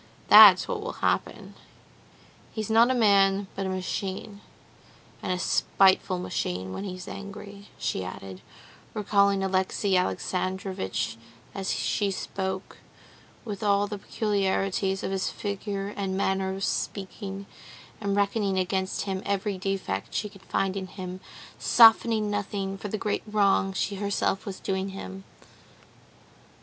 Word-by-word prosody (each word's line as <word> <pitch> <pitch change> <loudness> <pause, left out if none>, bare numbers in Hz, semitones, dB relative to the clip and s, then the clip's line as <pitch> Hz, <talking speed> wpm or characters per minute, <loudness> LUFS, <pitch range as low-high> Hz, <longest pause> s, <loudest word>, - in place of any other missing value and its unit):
That's - - +10
what 465 -4 -3
will 465 - -4
happen. - - -2 1.0
He's 220 -1 -4
not 230 +2 +6
a 260 - +2
man, 200 -3 +4
but 195 0 -2
a - - -2
machine, 190 +2 -4 0.8
and - - -2
a 180 - 0
spiteful 190 0 +3
machine 95 - -3
when 200 - -5
he's 185 -1 -7
angry," 200 0 -9
she 95 - -2
added, 95 0 -8 0.5
recalling 200 -1 +2
Alexey 190 +1 +1
Alexandrovitch 180 - -2 0.4
as 195 -1 -2
she 205 -2 0
spoke, 190 0 -4 0.7
with 205 -3 -5
all 200 -1 +3
the 205 0 -6
peculiarities 195 -2 0
of - - -2
his 190 -1 -1
figure 200 -1 -4
and 195 -2 -3
manner 190 -1 0
of 195 - -5
speaking, 195 0 -3 0.6
and 200 -1 0
reckoning 200 -1 +1
against 190 +1 -1
him 190 -2 -3
every 200 -1 -1
defect 185 - -3
she 210 - -1
could 195 -1 -16
find 195 0 -1
in 190 -1 -4
him, 185 -1 -7 0.4
softening 225 -2 +5
nothing 200 -1 -2
for 195 - -6
the 215 - -3
great 210 0 -1
wrong 200 -2 +2
she 195 +1 -2
herself 200 0 -1
was 195 - -5
doing 190 0 -2
him. 195 0 -8
195 Hz, 135 wpm, -27 LUFS, 190-205 Hz, 1.0 s, That's